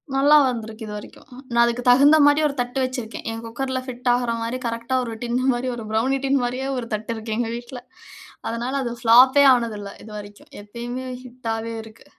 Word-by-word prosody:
நல்லா 285 +3 +5
வந்திருக்கு 225 -2 -5
இதுவரைக்கும். 210 +4 -10 0.2
நான் 235 0 +5
அதுக்கு 235 +1 0
தகுந்த 285 +5 +7
மாதிரி 290 +1 +5
ஒரு 280 - -4
தட்டு 245 +2 -3
வச்சிருக்கேன். 255 -3 -5
என் 225 - -6
குக்கர்ல 260 +3 -3
ஃபிட் 250 -1 -3
ஆகுற 245 -1 0
மாரி, 230 +2 -2
கரெக்ட்டா, 235 +3 -3
ஒரு 230 -2 -5
டின்னு 245 +1 -1
மாரி, 250 +1 -2
ஒரு 230 -2 -7
ப்ரவுனி 255 +5 +1
டின் 275 0 +2
மாரியே 255 +2 -2
ஒரு 240 -2 -4
தட்டு 215 +2 -3
இருக்கு 220 0 -4
எங்க 230 -1 -1
வீட்ல. 240 +1 -8 0.7
அதனால 235 +3 -3
அது 240 - -3
பிளாப்பே 255 +5 +7
ஆனது 235 -3 -1
இல்லை 200 -1 -8
இதுவரைக்கும். 205 -1 -11
எப்பயுமே 240 +4 -6 0.2
ஹிட்டாவே 230 -2 -5
இருக்கு. 220 0 -16
240 Hz, 180 wpm, -22 LUFS, 225-255 Hz, 0.7 s, தகுந்த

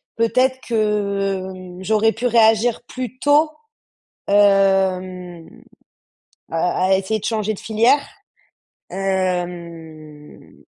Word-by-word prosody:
peut-être 255 +3 +1
que, 200 -3 -1
mmh, 185 0 -11
j'aurais 220 +2 +2
pu 240 +3 -2
réagir 225 0 +3
plus 255 -1 -6
tôt, 295 +2 +3 0.8
hem, 190 -3 +1 1.0
à 175 +2 0
à 190 - +4
essayer 195 +3 -2
de - - -12
changer 215 -1 -1
de - - -11
filière. 230 +6 +2 0.9
hem 170 -5 -5
195 Hz, 95 wpm, -20 LUFS, 180-225 Hz, 1.0 s, à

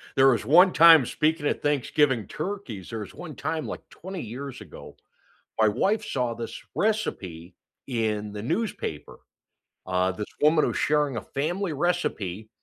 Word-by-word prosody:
there 135 0 +6
was 115 -5 +1
one 180 - +6
time- 165 -4 +8
speaking 155 +4 0
of - - -1
Thanksgiving 145 -4 +1
turkeys- 180 - -6
there 115 - -4
was 105 - -8
one 160 -5 -9
time, 155 +3 -3
like, - - -7
20 190 0 -7
years 130 +4 -7
ago, - - -12 0.6
my 110 - +6
wife 200 - +1
saw 125 - -1
this 115 0 -6
recipe 95 - -2 0.3
in 110 -4 -2
the 105 0 -6
newspaper. 115 - -3 0.7
Uh, 90 0 +1
this 105 +3 -5 0.2
woman 155 +1 +5
was - - -2
sharing 150 -3 +1
a 110 - -3
family 170 +6 -2
recipe, 115 - -2
135 Hz, 150 wpm, -26 LUFS, 110-165 Hz, 0.7 s, time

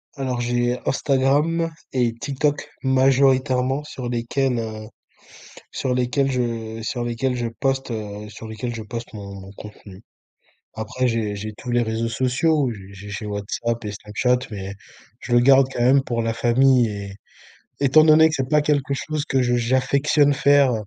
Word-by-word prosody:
Alors 130 -3 -2
j'ai 120 +1 0
Instagram 145 +5 +1 0.2
et 120 -3 +1
TikTok 145 +3 -2
majoritairement 130 0 +2
sur 130 -4 -6
lesquels, 120 +1 -1
heu, 110 -1 -6 0.8
sur 130 -1 -2
lesquels 125 +2 +1
je 115 -3 -3
sur 120 +2 -3
lesquels 125 +2 -1
je 120 -1 -2
poste, 135 -2 0
heu, 105 -1 -6
sur 110 +1 -10
lesquels 115 +2 -5
je 110 - -5
poste 115 +2 -7
mon 100 -2 -8
mon 95 +1 -11
contenu. 105 -1 -12 0.7
Après 125 +3 -2
j'ai 110 -3 -1
j'ai 105 +1 -6
tous 125 - -7
les 120 0 +2
réseaux 115 0 -2
sociaux, 130 +3 +1
j'ai 95 -1 -12
j'ai 100 +1 -10
j'ai 105 +1 -6
WhatsApp 105 +3 -3
et 105 - -4
Snapchat, 105 +5 0
mais 100 -1 -6 0.5
je 120 - -6
le 120 - +6
garde 135 +1 +6
quand - - -4
même 135 +2 +5
pour 120 -3 -2
la 115 0 -1
famille 125 0 +3
et 100 -1 -6 0.6
étant 140 +3 +5
donné 160 0 +7
que 155 - -3
c'est 130 -3 -2
pas 150 - +4
quelque 145 -2 0
chose 155 +1 -3
que 135 -4 0
je 120 -1 +1
j'affectionne 135 +4 +2
faire 140 -2 +4
125 Hz, 165 wpm, -22 LUFS, 110-135 Hz, 0.8 s, donné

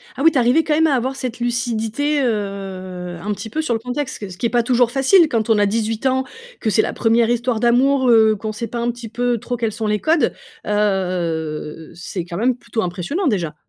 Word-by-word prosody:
Ah 260 - -5
oui, 325 - +7
tu 285 - -1
es - - +5
arrivé 250 +7 +3
quand 310 - 0
même 320 +1 +4
à 285 - +2
avoir 260 +2 -1
cette 255 -3 -5
lucidité, 240 +4 -1
heu, 190 -5 -4
un 210 +3 -2
petit 220 - -7
peu 310 +9 -2
sur 310 -6 -1
le 225 - -1
contexte, 255 +4 -4
que 205 - -6
ce 180 - -10
qui - - -3
est - - +2
pas 240 0 +2
toujours 245 -1 +2
facile, 275 +7 +5
quand 230 -3 -1
on 220 - +4
a 205 - +4
18 220 +3 -1
ans, 260 0 +2 0.4
que 220 - 0
c'est 215 +1 +3
la - - -3
1re 230 0 +2
histoire 240 -1 0
d'amour, 255 +3 +3
heu, 220 -2 +5
qu'on 215 +1 -4
sait 225 +2 -5
pas 235 +2 -5
un 235 +1 0
petit 235 -1 -9
peu 245 +1 0
trop 245 +3 -4
quels 225 -2 -1
sont 220 0 -3
les 210 0 +1
codes, 315 +4 +2 0.3
heu, 170 -7 -1
c'est 175 0 -5
quand 170 0 -6
même 245 +3 +2
plutôt 230 -2 -4
impressionnant 185 - -2
déjà! 180 - -1
230 Hz, 240 wpm, -20 LUFS, 205-250 Hz, 0.4 s, oui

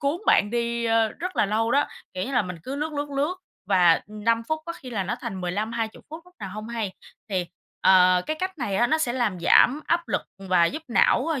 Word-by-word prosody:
cuốn 280 +3 0
bạn 205 - +4
đi, 235 0 -1
ơ, 225 -1 +3
rất 365 +10 -6
là - - +3
lâu 225 +3 0
đó. 285 +3 +3 0.3
Kiểu 185 +1 -2
như 275 - -5
là 245 -4 +3
mình 180 -2 -6
cứ 270 +7 -5
lướt, 305 +2 -3
lướt, 290 0 -3
lướt, 285 +6 0 0.3
và, 175 -4 +6
ừm, 210 0 -10
5 230 0 +2
phút, 315 0 -1
có 335 - -3
khi 255 -6 -11
là 205 -4 -1
nó 185 - -2
thành 190 -1 -5
15-20 220 +5 -3
phút 315 - -7
lúc 360 0 -21
nào 195 - -5
hông 215 +3 -7
hay. 220 -5 -3 0.4
Thì, 185 -3 -1 0.3
ờ, 185 -1 +5
cái 310 - -2
cách 375 -2 -3
này 205 -7 -2
á, 240 +4 +3
nó 315 +4 +1
sẽ 245 -6 0
làm 220 -8 -1
giảm 265 - +5
áp 340 0 0
lực - - 0 0.2
và 185 -3 +2
giúp 305 - -2
não, 245 +3 +3
ơ, 320 -5 -1
230 Hz, 245 wpm, -25 LUFS, 195-290 Hz, 0.4 s, và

